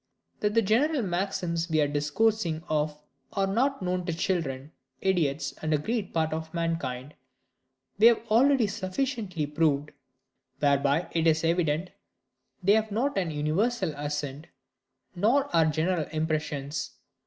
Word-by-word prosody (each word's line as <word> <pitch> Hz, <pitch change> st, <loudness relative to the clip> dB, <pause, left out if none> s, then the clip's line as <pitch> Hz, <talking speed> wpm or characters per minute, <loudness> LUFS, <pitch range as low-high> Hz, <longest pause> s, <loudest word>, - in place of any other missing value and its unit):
That 210 Hz, +1 st, 0 dB
the 230 Hz, -, +4 dB
general 260 Hz, +7 st, +2 dB
maxims 175 Hz, -2 st, -2 dB
we 155 Hz, -1 st, +2 dB
are 145 Hz, -, +3 dB
discoursing 160 Hz, +4 st, 0 dB
of 150 Hz, -1 st, -1 dB, 0.3 s
are 195 Hz, -1 st, +1 dB
not 240 Hz, +4 st, 0 dB
known 180 Hz, 0 st, -1 dB
to 170 Hz, -, 0 dB
children, 155 Hz, -6 st, -2 dB, 0.3 s
idiots, 165 Hz, -7 st, 0 dB
and 155 Hz, -, -2 dB
a 155 Hz, -, +4 dB
great 210 Hz, +6 st, -2 dB
part 160 Hz, -1 st, 0 dB
of 160 Hz, 0 st, -4 dB
mankind, 150 Hz, -5 st, -2 dB, 0.9 s
we 220 Hz, -, +8 dB
have 235 Hz, -1 st, +3 dB
already 260 Hz, +2 st, +5 dB
sufficiently 200 Hz, -, -2 dB
proved: 150 Hz, -1 st, 0 dB, 0.7 s
whereby 140 Hz, +3 st, +2 dB
it 165 Hz, 0 st, +1 dB
is 160 Hz, 0 st, +3 dB
evident 165 Hz, 0 st, +1 dB, 0.7 s
they 200 Hz, +3 st, +5 dB
have 220 Hz, 0 st, +1 dB
not 260 Hz, +7 st, 0 dB
an 180 Hz, -4 st, 0 dB
universal 160 Hz, +6 st, 0 dB
assent, 145 Hz, 0 st, -4 dB, 0.7 s
nor 255 Hz, +10 st, +2 dB
are 165 Hz, -1 st, +5 dB
general 160 Hz, +1 st, 0 dB
impressions. 155 Hz, -2 st, -2 dB
165 Hz, 135 wpm, -27 LUFS, 150-205 Hz, 0.9 s, we